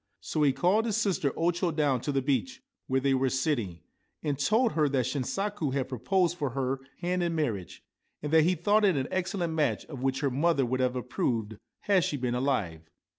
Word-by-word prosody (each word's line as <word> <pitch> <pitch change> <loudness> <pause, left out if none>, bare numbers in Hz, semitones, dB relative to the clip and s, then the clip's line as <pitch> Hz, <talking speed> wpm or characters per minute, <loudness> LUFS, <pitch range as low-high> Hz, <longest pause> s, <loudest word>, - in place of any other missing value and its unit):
So 155 - -3
he 145 -2 +5
called 180 - +2
his 215 -2 0
sister 190 -10 +1
O 170 +2 +2
Cho 175 +1 -1
down 145 -6 +1
to 145 - -2
the 135 -2 0
beach, 260 - -1 0.2
where 130 0 +1
they 135 0 +1
were 130 0 +2
sitting, 120 - -1 0.4
and 145 -2 -1
told 220 - +3
her 150 -3 +2
that 130 -3 +1
Shinsaku 150 - -2
had 130 -2 -1
proposed 175 - 0
for 145 -3 0
her 135 0 -1 0.2
hand 180 +1 0
in 170 -1 0
marriage, 110 - -3 0.4
and 150 +1 -3
that 160 - +7
he 180 +2 +3
thought 205 +6 +2
it 190 -7 +4
an 130 0 -1
excellent 185 -2 -1
match, 145 -9 0
of 140 -5 -8
which 135 +1 0
her 140 -2 +1
mother 140 +1 +2
would 130 +2 -1
have 130 0 +1
approved 115 -3 -2 0.2
had 195 -3 +3
she 145 - -1
been 125 -2 -1
alive. 100 - -1
145 Hz, 210 wpm, -28 LUFS, 130-175 Hz, 0.4 s, that